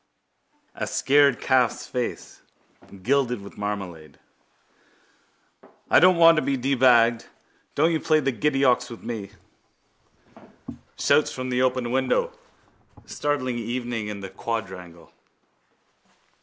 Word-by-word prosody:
A - - -5
scared 140 -2 +3
calf's 130 -2 +1
face 125 -1 -5 0.6
gilded 125 -1 +1
with 100 - -12
marmalade. 95 -7 -6 1.7
I - - +7
don't 185 +1 +5
want 165 -1 +6
to - - +2
be 140 -2 -1
debagged! 120 -3 +3 0.5
Don't 160 +4 +3
you 160 - 0
play 155 0 +2
the 135 -2 0
giddy 135 +3 0
ox 125 0 +2
with 115 - -11
me! 110 -4 -6 1.7
Shouts 145 +1 +2
from 130 0 -5
the 125 0 0
open 130 -2 0
window 300 - 0 0.7
startling 130 -5 -2
evening 120 -1 -4
in 105 -1 -6
the 95 - -7
quadrangle. 95 -6 -7
125 Hz, 115 wpm, -24 LUFS, 110-140 Hz, 1.7 s, I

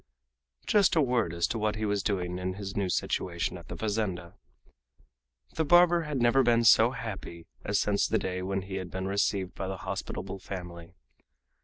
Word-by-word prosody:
Just 205 -4 +4
a - - +4
word 125 - +1
as 85 0 0
to 115 - -2
what 105 0 0
he 110 0 -2
was 100 -1 0
doing 90 -3 -2
in 90 0 -3
his 100 -1 -6
new 100 -2 0
situation 85 -1 -1
at 85 -2 -11
the - - -6
fazenda. 100 -6 -2 1.2
The 160 - 0
barber 175 +2 +5
had 150 -3 -2
never 120 +3 +4
been 120 -2 +3
so 115 +1 +7
happy 110 -9 -7 0.2
as 100 - 0
since 100 -1 +1
the - - +1
day 90 0 -3
when 95 +1 -2
he 95 0 -5
had 95 -2 -5
been 95 +1 -4
received 95 -1 0
by 95 - -5
the 95 0 -4
hospitable 95 - -5
family. 90 -3 -8
100 Hz, 185 wpm, -29 LUFS, 90-115 Hz, 1.2 s, so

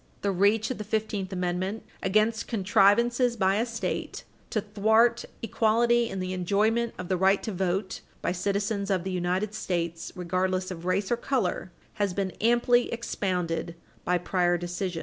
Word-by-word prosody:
The 200 - +2
reach 205 +5 +2
of 255 - -5
the - - -3
Fifteenth 210 -2 -2
Amendment 185 +3 -2 0.2
against 215 +3 +1
contrivances 235 +4 +3
by 195 0 +2
a 230 +3 0
state 230 -1 -4 0.3
to 215 - 0
thwart 220 +3 +2 0.2
equality 235 +1 +2
in 195 - -4
the 185 0 -3
enjoyment 215 +6 +1
of 180 - -6
the 185 - 0
right 190 +2 +3
to 220 - -3
vote 190 +1 -2 0.2
by - - -1
citizens 200 +2 -1
of 185 -3 +1
the 190 - -3
United 185 +3 -1
States 170 -4 -3
regardless 185 +1 -1
of 175 -1 -7
race 190 +3 0
or 240 - +2
color 230 -8 -1 0.3
has 200 -3 0
been 195 -2 -1
amply 240 +2 +3
expounded 180 -7 -2 0.3
by 180 0 +2
prior 175 0 +1
decisions. 175 0 -3
195 Hz, 160 wpm, -27 LUFS, 185-220 Hz, 0.3 s, contrivances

